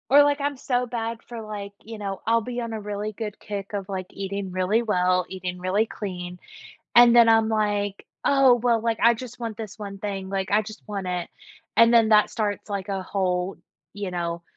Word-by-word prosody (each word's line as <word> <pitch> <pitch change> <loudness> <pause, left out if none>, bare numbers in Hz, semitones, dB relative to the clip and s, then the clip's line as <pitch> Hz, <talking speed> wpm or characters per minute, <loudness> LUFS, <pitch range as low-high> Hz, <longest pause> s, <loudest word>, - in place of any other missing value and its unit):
Or, 290 +1 +9
like, 290 0 +1
I'm 285 -1 -1
so 250 -1 0
bad 230 -1 -3
for, 235 -2 -7
like, 205 -2 -6
you 225 0 -7
know, 195 -2 -5
I'll 230 0 +4
be 245 +2 -4
on 230 -1 -4
a 220 - -4
really 210 +1 -4
good 210 -1 -6
kick 200 -2 -6
of, 200 -2 -3
like, 190 -2 -4
eating 195 -1 -4
really 185 +5 +1
well, 185 -4 +2
eating 185 -1 -5
really 185 +4 +1
clean, 180 -5 -6 0.6
and 240 0 +9
then 235 -1 +7
I'm 225 -1 +5
like, 205 -2 0 0.2
"Oh 275 -3 +6
well, 235 -1 +2
like, 225 0 0
I 235 +1 +6
just 245 +1 -9
want 230 -3 -4
this 220 0 -7
one 200 -2 -7
thing, 195 -2 -4
like, 195 0 -2
I 210 +1 +4
just 215 +1 -10
want 200 -2 -4
it," 180 -1 -3 0.5
and 230 +1 +6
then 225 -2 +6
that 210 -1 +5
starts, 210 -3 -2
like, 200 -1 -4
a 195 -1 -2
whole, 185 -1 -1 0.4
you 200 -2 -4
know, 170 -1 -3
210 Hz, 210 wpm, -25 LUFS, 195-230 Hz, 0.6 s, Or